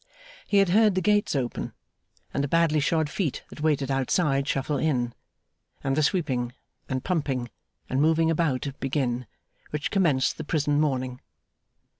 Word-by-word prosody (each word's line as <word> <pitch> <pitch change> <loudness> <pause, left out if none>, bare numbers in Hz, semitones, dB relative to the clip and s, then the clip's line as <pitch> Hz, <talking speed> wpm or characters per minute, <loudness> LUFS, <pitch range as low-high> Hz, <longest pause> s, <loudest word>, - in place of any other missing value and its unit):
He 205 - +2
had 195 -2 +5
heard 210 +1 +4
the 185 - +1
gates 205 -2 +2
open; 125 -3 -2 0.6
and 140 - 0
the - - 0
badly 165 0 +3
shod 155 +1 +1
feet 155 -2 -2
that - - -9
waited 145 -3 +1
outside 135 +1 +1
shuffle 140 +2 0
in; 125 -5 0 0.7
and 135 0 +1
the 155 - +2
sweeping, 135 -8 0 0.4
and 130 -1 -2
pumping, 135 -9 -1 0.4
and 130 +2 0
moving 160 +1 +3
about, 150 -6 0
begin, 125 -3 -1 0.4
which 150 0 -3
commenced 155 -10 +2
the - - -3
prison 145 -1 +1
morning. 130 -4 -1
145 Hz, 150 wpm, -26 LUFS, 130-165 Hz, 0.7 s, had